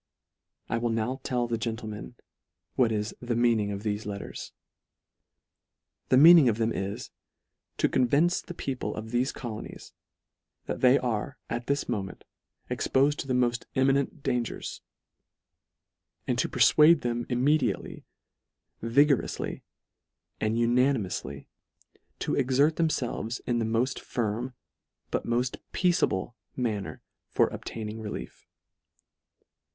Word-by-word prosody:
I 115 Hz, -, -1 dB
will 120 Hz, 0 st, 0 dB
now 115 Hz, +4 st, -1 dB
tell 125 Hz, -2 st, -1 dB
the 115 Hz, -1 st, -2 dB
gentlemen, 110 Hz, 0 st, -5 dB, 0.6 s
what 120 Hz, -3 st, +3 dB
is 105 Hz, 0 st, -2 dB
" -, -, -45 dB
the 120 Hz, -1 st, -1 dB
meaning 115 Hz, -3 st, +2 dB
of 100 Hz, 0 st, -5 dB
thefe 105 Hz, 0 st, -2 dB
letters." 100 Hz, -1 st, -6 dB, 1.6 s
The 130 Hz, -, +5 dB
mean 165 Hz, +5 st, +10 dB
ing 135 Hz, -6 st, +5 dB
of 110 Hz, -, 0 dB
them 115 Hz, 0 st, +1 dB
is, 100 Hz, +1 st, -4 dB, 0.7 s
to -, -, +3 dB
convince 145 Hz, +8 st, +2 dB
the 175 Hz, -, -9 dB
people 135 Hz, -5 st, -3 dB
of 110 Hz, +1 st, -6 dB
thefe 125 Hz, +2 st, +1 dB
colonies, 115 Hz, -4 st, -8 dB, 0.7 s
that -, -, -4 dB
they 130 Hz, +1 st, +6 dB
are 125 Hz, +2 st, -2 dB
at 120 Hz, +1 st, -3 dB
this 140 Hz, +1 st, 0 dB
moment 100 Hz, -5 st, -4 dB, 0.4 s
expofed 140 Hz, +2 st, +1 dB
to -, -, -5 dB
the 130 Hz, -, 0 dB
molt 120 Hz, -1 st, +1 dB
imminent 135 Hz, +1 st, +1 dB
dangers; 125 Hz, -3 st, -2 dB, 1.4 s
and -, -, 0 dB
jto -, -, +1 dB
perfuade 155 Hz, +1 st, +6 dB
them 120 Hz, -1 st, -2 dB
immediately, 130 Hz, -2 st, 0 dB, 0.8 s
vigouroufly, 140 Hz, +4 st, +1 dB, 0.8 s
and 110 Hz, +1 st, 0 dB
unanimoufly, 120 Hz, -, +1 dB, 0.7 s
to -, -, -2 dB
exert 140 Hz, +4 st, +2 dB
themfelves, 125 Hz, -7 st, -1 dB
in 120 Hz, -1 st, 0 dB
the 115 Hz, -, 0 dB
mod 115 Hz, +4 st, 0 dB
firm, 120 Hz, +2 st, -3 dB, 0.6 s
but -, -, -2 dB
moft 120 Hz, +2 st, 0 dB, 0.2 s
peaceable 170 Hz, -, +1 dB, 0.2 s
manner 110 Hz, -6 st, -3 dB, 0.3 s
for -, -, +3 dB
obtaining 110 Hz, -1 st, -6 dB
relief. 105 Hz, -1 st, -7 dB
120 Hz, 125 wpm, -28 LUFS, 110-135 Hz, 1.6 s, mean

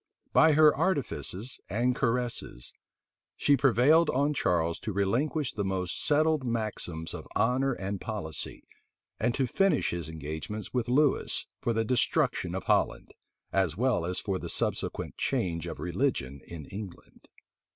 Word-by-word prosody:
By 160 Hz, -1 st, +6 dB
her 150 Hz, 0 st, +6 dB
artifices 130 Hz, -, -1 dB
and 120 Hz, +5 st, +1 dB
caresses, 120 Hz, -, -2 dB, 0.6 s
she 145 Hz, -, +4 dB
prevailed 140 Hz, +5 st, +4 dB
on 140 Hz, +3 st, +2 dB
Charles 85 Hz, -, +1 dB
to 110 Hz, -, -4 dB
relinquish 120 Hz, +9 st, 0 dB
the 100 Hz, -, -2 dB
most 95 Hz, -2 st, -2 dB
settled 155 Hz, -1 st, +3 dB
maxims 110 Hz, -9 st, -3 dB
of -, -, -7 dB
honor 130 Hz, +3 st, +2 dB
and 100 Hz, -3 st, -4 dB
policy, 85 Hz, -9 st, -4 dB, 0.6 s
and 120 Hz, +3 st, +1 dB
to 135 Hz, -, +1 dB
finish 195 Hz, -, +2 dB
his 85 Hz, -2 st, -4 dB
engagements 80 Hz, +7 st, -6 dB
with 125 Hz, -2 st, -1 dB
Lewis 140 Hz, +2 st, +2 dB
for 120 Hz, -, 0 dB
the 115 Hz, 0 st, 0 dB
destruction 125 Hz, +1 st, +1 dB
of -, -, -3 dB
Holland, -, -, 0 dB, 0.4 s
as 95 Hz, -4 st, +1 dB
well 120 Hz, -6 st, +2 dB
as 90 Hz, +2 st, -2 dB
for 95 Hz, -3 st, -2 dB
the -, -, -6 dB
subsequent -, -, -2 dB
change 85 Hz, -3 st, -1 dB
of -, -, -6 dB
religion 80 Hz, -, -1 dB
in 80 Hz, -4 st, -8 dB
England. 100 Hz, 0 st, -10 dB
110 Hz, 140 wpm, -29 LUFS, 90-135 Hz, 0.6 s, By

